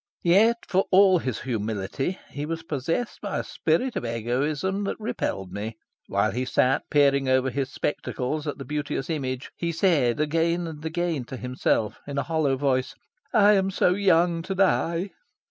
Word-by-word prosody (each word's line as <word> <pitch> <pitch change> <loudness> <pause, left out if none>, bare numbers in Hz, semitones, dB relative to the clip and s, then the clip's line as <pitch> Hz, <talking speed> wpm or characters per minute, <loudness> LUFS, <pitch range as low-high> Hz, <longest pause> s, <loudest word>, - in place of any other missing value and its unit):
Yet, 210 +7 +5
for 190 0 +2
all 190 -1 +6
his 130 -7 -3
humility, 110 - -2
he 145 +1 -4
was 165 0 -4
possessed 165 - -3
by 205 - -3
a - - -1
spirit 170 +11 0
of - - -2
egoism 140 - -1
that - - -3
repelled 95 - -3
me. 110 +2 -5 0.3
While - - +1
he 125 +5 -2
sat 130 +1 +1
peering 140 -2 +3
over 130 0 +2
his 135 0 -2
spectacles 145 +1 -3
at 145 - -3
the 135 - -7
beauteous 150 0 -3
image, 130 -4 -3
he 170 -1 -2
said 155 -9 +2
again 165 +3 +1
and 155 -2 -8
again 160 -4 -2
to 130 - -7
himself, 125 -4 -1
in 140 -1 -5
a 140 - +1
hollow 155 -5 0
voice, 130 -2 0 0.4
"I 210 -4 +6
am 195 -1 +2
so 180 -1 +2
young 175 -3 +3
to 190 +3 -4
die." 185 -1 +1
150 Hz, 170 wpm, -25 LUFS, 130-175 Hz, 0.4 s, all